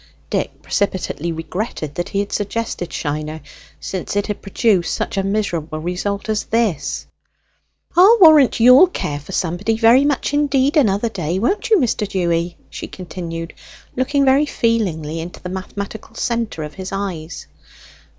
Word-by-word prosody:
Dick - - -2
precipitately 185 -4 -1
regretted 165 -1 -4
that 175 - -3
he 200 - 0
had 200 - -5
suggested 205 -3 -3
Shiner, 155 +1 -3 0.4
since 190 +1 -4
it 205 - +1
had 210 - -4
produced 195 -3 +1
such - - -3
a 195 - +1
miserable 185 -6 -2
result 180 +4 -3
as 215 -1 -1
this. 210 -11 -1 0.9
"I'll 390 +7 +7
warrant 310 -9 +7
you'll 250 +9 +8
care 145 - -4
for 145 - -11
somebody 185 +6 -1
very 235 +4 +6
much 285 0 0
indeed 285 -1 +2
another 225 -6 +3
day, 175 -4 -2
won't 395 - 0
you, 440 - +6
Mr. 230 - 0
Dewy?" 175 -3 -1
she - - -6
continued, 170 -2 -7 0.4
looking 275 +2 +1
very 275 +3 +4
feelingly 175 - -1
into 170 +2 -7
the 180 - -7
mathematical 200 +4 -6
centre 230 -9 -2
of 150 0 -7
his 190 0 -7
eyes. 185 -5 -5
200 Hz, 150 wpm, -19 LUFS, 170-235 Hz, 0.9 s, you'll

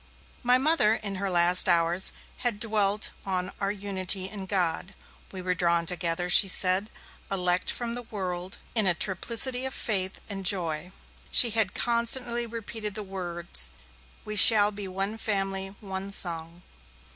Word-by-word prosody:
My 245 0 +3
Mother, 260 -6 +2
in 200 -3 -6
her 200 - -2
last 175 +1 +5
hours, 170 +2 +3 0.3
had 240 -5 -1
dwelt 210 -2 -1
on 185 -1 -3
our 195 0 -1
unity 195 -2 0
in 195 -1 -9
God; 185 0 -2 0.4
we 185 -2 -9
were 180 0 -1
drawn 170 -1 -1
together, 175 0 -3
she 185 +3 +5
said, 185 +2 +2 0.4
elect 180 -1 -1
from 235 -1 -3
the 245 - -6
world, 185 -5 -7 0.2
in 220 -4 +1
a 175 - +1
triplicity 230 +8 +3
of 265 0 -5
faith 190 -4 -1
and 195 -2 -8
joy. 175 -3 -1 0.4
She 235 - +7
had 215 -4 0
constantly 235 0 0
repeated 220 -2 -6
the 215 - -6
words: 175 - -1 0.6
'We 215 0 -5
shall 210 -2 +8
be 200 -1 -8
one 195 +4 -4
family, 195 -2 -3
one 195 -1 -7
song. 170 -2 -4
195 Hz, 150 wpm, -25 LUFS, 180-215 Hz, 0.6 s, shall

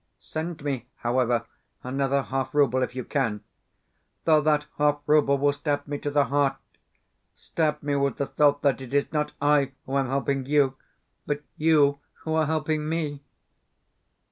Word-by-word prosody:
Send 160 -1 -5
me, 135 -4 -3
however, 120 -1 0 0.4
another 135 +1 0
half 135 +1 -3
rouble 130 -3 +3
if 125 - -2
you 130 - -3
can 115 -8 -1 0.8
(though 155 -2 +5
that 150 0 +2
half 145 0 +3
rouble 145 -2 +4
will 145 +1 +2
stab 145 0 -2
me 145 0 -3
to 145 - -3
the 145 -1 +3
heart 140 +1 +1 0.8
stab 150 -2 -2
me 145 0 0
with 140 -3 +1
the 140 - -1
thought 145 0 +2
that 140 -2 +2
it 130 +1 -6
is 145 +2 +1
not 150 -1 -1
I 145 -2 +2
who 135 +1 -1
am 135 - 0
helping 135 0 -1
you, 140 -2 +3 0.5
but 145 0 -2
YOU 150 -3 +3 0.2
who 160 - -2
are 160 -1 +2
helping 155 -1 -1
ME). 150 -3 -2
145 Hz, 165 wpm, -26 LUFS, 135-150 Hz, 0.8 s, though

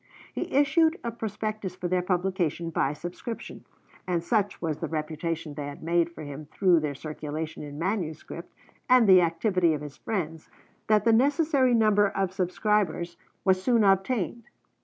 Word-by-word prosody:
He - - -4
issued 315 +4 +3
a 235 - -2
prospectus 215 -3 -4
for 180 -1 -4
their 180 0 +1
publication 180 -2 -1
by 140 -3 0
subscription; 175 +9 -7 0.4
and 175 -2 0
such 205 0 0
was 160 -3 -2
the 165 - -3
reputation 155 0 -3
they 145 -1 -5
had 145 +1 -9
made 170 +1 +2
for 165 -2 -10
him 145 +1 -8
through 180 +1 +3
their 150 -2 -3
circulation 155 +1 -5
in 145 -1 -8
manuscript, 170 -2 -4 0.4
and 250 -3 +6
the 185 -2 +8
activity 170 0 +2
of 150 - -6
his 150 -1 -9
friends, 165 -7 -4 0.4
that 215 -1 +3
the 230 - +5
necessary 275 0 +3
number 210 -2 +4
of 195 -2 -2
subscribers 185 -2 0 0.3
was 190 -1 +3
soon 235 +1 +3
obtained. 200 +3 +1
180 Hz, 160 wpm, -27 LUFS, 160-215 Hz, 0.4 s, the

